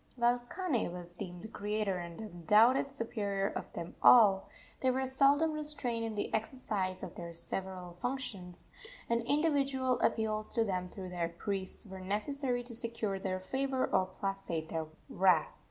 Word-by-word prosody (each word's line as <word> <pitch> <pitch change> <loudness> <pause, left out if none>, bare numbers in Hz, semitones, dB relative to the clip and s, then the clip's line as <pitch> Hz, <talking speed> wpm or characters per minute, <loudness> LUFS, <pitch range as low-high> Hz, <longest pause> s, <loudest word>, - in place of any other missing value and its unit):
While 240 0 +3
Kane 255 - -1
was 175 -1 -5
deemed 180 -1 -7
the - - -5
creator 210 -3 -1
and 170 -1 -7
undoubted 215 - +4
superior 205 -6 -1
of - - -6
them 170 - -6
all, 205 -6 +7 0.3
they 260 - +2
were 260 +1 +1
seldom 280 +4 +4
restrained 295 -7 -3
in 225 -1 -3
the 205 - -2
exercise 215 -5 -1
of - - -6
their 170 -1 -7
several 180 0 -4
functions, 225 -9 -4 0.4
and 235 0 +2
individual 275 -2 +2
appeals 215 -1 0
to 230 - +4
them 185 -4 -1
through 185 -1 -6
their 175 -2 -1
priests 190 +4 -4
were 190 -2 -8
necessary 245 +6 -1
to 240 0 -7
secure 225 -4 -2
their 190 -1 -2
favor 265 +6 0
or 185 -1 +2
placate 185 -4 -3
their 160 -1 -2 0.2
wrath. 180 -4 +3
215 Hz, 155 wpm, -33 LUFS, 185-255 Hz, 0.4 s, all